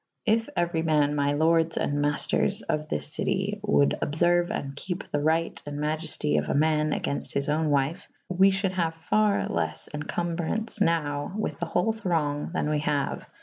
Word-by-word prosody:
If 225 +1 +2
euer}' 170 -2 0
man 150 -2 +2
my 145 -1 +1
lordes 160 +2 +2
and 145 0 0
maifters 145 0 +2
of 155 0 -2
this 150 - -3
citie 195 +6 -1
wolde 205 -9 +2
obferue 175 +3 +2
and 140 0 -4
kepe 180 +6 -4
the 145 - 0
ryght 160 +3 0
and 145 0 -5
maielty 150 - 0
of 75 - -7
a - - 0
man 155 +1 +2
agaynfte 140 -1 -2
his 140 0 0
owne 155 +1 +1
wvfe 145 +7 0
/ - - -47
we 190 +2 +5
fhulde 195 0 0
haue 175 -3 0
ferre 210 +5 +1
leffe 80 -1 -2
encombrance 175 +8 -1
nowe 150 -5 0
with 215 - -3
the 170 - -2
hole 180 +7 +1
thronge 165 -9 -1
than 180 - -1
we 150 - +1
haue. 145 -2 -1
160 Hz, 180 wpm, -26 LUFS, 145-175 Hz, -, we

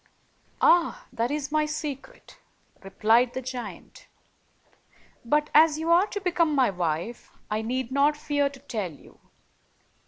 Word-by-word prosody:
"Ah, 345 -1 +3
that 235 0 -1
is 290 0 -3
my 305 0 +1
secret," 305 - -7 0.4
replied 225 +5 +2
the 260 - -2
giant. 250 -1 -8 1.2
"But 295 +5 0
as 310 0 +6
you 325 +1 -1
are 355 +4 +5
to 410 - -5
become 345 -5 +1
my 260 -6 +3
wife, 175 +5 -3 0.2
I 215 +1 0
need 250 +2 -3
not 285 +2 +2
fear 290 -1 0
to 275 -1 -14
tell 215 -10 -4
you. 145 - -18
280 Hz, 135 wpm, -26 LUFS, 235-305 Hz, 1.2 s, as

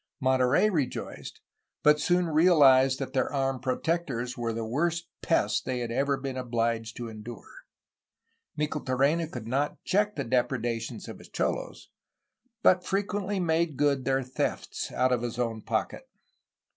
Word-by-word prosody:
Monterey 130 +6 +3
rejoiced, 150 -8 -4 0.2
— - - -34
^but 150 0 +6
soon 175 +2 +2
realized 145 -6 +5
that 135 - -5
their 130 - +1
armed 135 -2 -1
''protectors" 130 -2 -1
were 120 -2 -2
the 115 0 -3
worst 165 +8 -1
pest 105 -11 +1
they 130 -1 -2
had 120 -1 -3
ever 140 +3 +1
been 135 -1 -5
obliged 115 -2 -1
to 120 - -5
endure. 115 - -10 0.9
Micheltorena 150 +1 +1
could 115 -3 -7
not 140 +5 -1
check 210 +2 +1
the - - -2
depredations 120 -2 -1
of - - -8
his - - -14
cholos, - - -3 0.7
but 180 0 +5
frequently 200 0 -1
made 165 -4 +1
good 140 -2 +2
their 135 0 +1
thefts 125 +1 -3
out 130 +1 +1
of 125 -2 +1
his 120 -1 -4
own 115 -3 -2
pocket. - - -3
135 Hz, 145 wpm, -28 LUFS, 120-160 Hz, 0.9 s, ^but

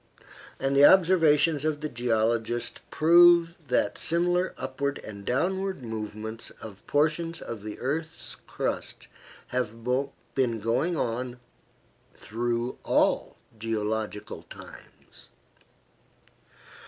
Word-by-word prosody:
And 135 +1 0
the 140 - +6
observations 160 -4 +5
of 155 -1 -1
the 155 - -2
geologist 115 -1 -1
prove 170 +1 +6
that 125 - +1
similar 175 +2 +1
upward 140 +2 -3
and 100 -2 -9
downward 190 - -1
movements 110 0 -6
of 105 -3 -10
portions 160 +3 +1
of 115 -3 -7
the 105 0 -7
earth's 155 +5 -2
crust - - -4 0.4
have 115 -2 -3 0.5
been 120 -4 +1
going 130 - 0
on 125 0 -2 0.8
through 120 +2 -3
all - - +1 0.2
geological 110 -1 -3
times. - - -14
130 Hz, 95 wpm, -27 LUFS, 115-160 Hz, 0.8 s, the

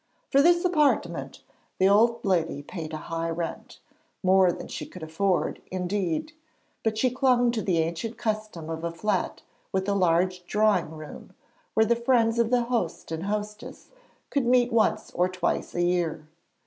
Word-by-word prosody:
For 275 - +5
this 345 +3 +4
'appartement' 305 -5 +1 0.3
the 190 - +4
old 230 +4 +3
lady 165 -6 0
paid 160 -2 -7
a 155 - -4
high 165 0 -2
rent 165 0 -5 0.4
more 185 -1 +5
than - - -7
she - - -6
could 180 - -10
afford, 175 +4 0
indeed; 185 - -2 0.5
but 220 -1 0
she 255 +2 +2
clung 250 -2 +3
to 230 -2 -2
the 185 -5 0
ancient 165 +8 -2
custom 215 -7 -3
of 160 0 -5
a 170 - -1
flat 185 +3 -2 0.3
with 190 0 -1
a 200 - +2
large 180 -1 +2
drawing 210 -6 +2
room, 155 -1 -10 0.4
where 220 - +5
the 235 - +3
friends 235 -1 +2
of 230 -1 +3
the 245 -1 +3
host 235 -10 -2
and 165 +3 -3
hostess 210 +1 -5 0.4
could 275 -4 +1
meet 245 -1 +3
once 225 -1 +1
or 180 +1 +1
twice 185 -1 -2
a 175 - +1
year. 175 -3 0
195 Hz, 165 wpm, -26 LUFS, 170-230 Hz, 0.5 s, For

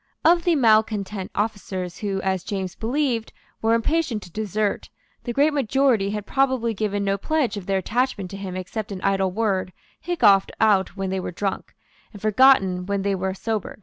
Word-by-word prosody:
Of 340 +1 +5
the 345 -2 +3
malecontent 215 -5 +2
officers, 190 -4 -3
who, 195 -2 -2
as 190 -2 -1
James 190 -2 -4
believed, 240 -1 -1 0.3
were 225 +1 +3
impatient 240 -2 0
to 175 - -13
desert, 210 +1 -2 0.4
the 240 - -2
great 290 +5 +3
majority 265 -6 +2
had 210 0 -4
probably 260 -3 +1
given 205 -1 -2
no 195 0 0
pledge 285 -4 0
of 200 -3 -7
their 195 -1 +1
attachment 215 -2 -1
to 195 - -6
him 190 -2 -6
except 195 +3 -5
an 190 -2 -5
idle 195 -1 +2
word 190 -2 -1 0.3
hiccoughed 205 - +3
out 205 -3 +2
when 195 -1 -2
they 190 - -1
were - - -4
drunk, 195 +2 -4 0.4
and 205 - -10
forgotten 205 -5 +4
when 200 -1 -1
they 200 0 +1
were 190 0 -2
sober. 220 0 -3
205 Hz, 180 wpm, -23 LUFS, 195-235 Hz, 0.4 s, Of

